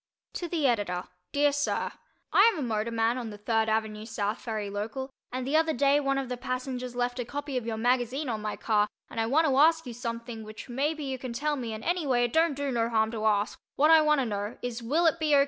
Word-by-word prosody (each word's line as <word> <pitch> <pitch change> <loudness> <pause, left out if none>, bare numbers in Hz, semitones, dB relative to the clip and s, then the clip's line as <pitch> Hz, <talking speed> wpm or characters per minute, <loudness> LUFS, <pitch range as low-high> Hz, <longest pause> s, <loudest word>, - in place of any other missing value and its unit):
To 350 - -3
the 325 -4 -1
Editor: 205 -8 +1 0.3
Dear 290 0 +3
Sir: 290 +1 -1 0.4
I 420 +4 +7
am 405 - -6
a 295 - -2
motorman 225 +2 0
on 235 -3 -5
the 210 - -8
Third 220 +1 +1
Ave. 215 -1 -1
South 215 -1 -2
Ferry 220 -4 -3
local, 220 +7 -4 0.2
and 255 0 -3
the 280 +4 0
other 320 0 +3
day 280 +2 +4
one 275 -1 0
of 270 -1 -2
the 250 0 -4
passengers 255 -1 -4
left 245 0 -1
a - - 0
copy 285 +3 -5
of 245 -2 -2
your 225 -1 -2
magazine 250 +4 +1
on 220 -3 -2
my 210 0 -3
car 210 -2 +2 0.2
and 230 - -4
I 225 - +1
want 310 +7 +3
to 275 -4 +2
ask 320 +2 +5
you 245 - -6
something 230 -1 -5
which 215 0 -9
maybe 295 +5 -1
you 265 -2 -3
can 255 -1 -5
tell 295 +5 0
me 240 -5 -4
and 220 0 -6
anyway 295 -9 +1
it 240 - -1
don't 325 -2 +3
do 280 0 -2
no 230 -2 +1
harm 220 -1 +2
to 220 -2 -3
ask 210 0 +1 0.2
what 300 +3 +5
I 320 -1 +8
want 300 -2 +3
to - - 0
know 205 0 -3
is 245 -1 -3
will 300 +9 +1
it 330 0 +3
be 305 -2 +3
O. - - +6
245 Hz, 250 wpm, -28 LUFS, 225-285 Hz, 0.4 s, I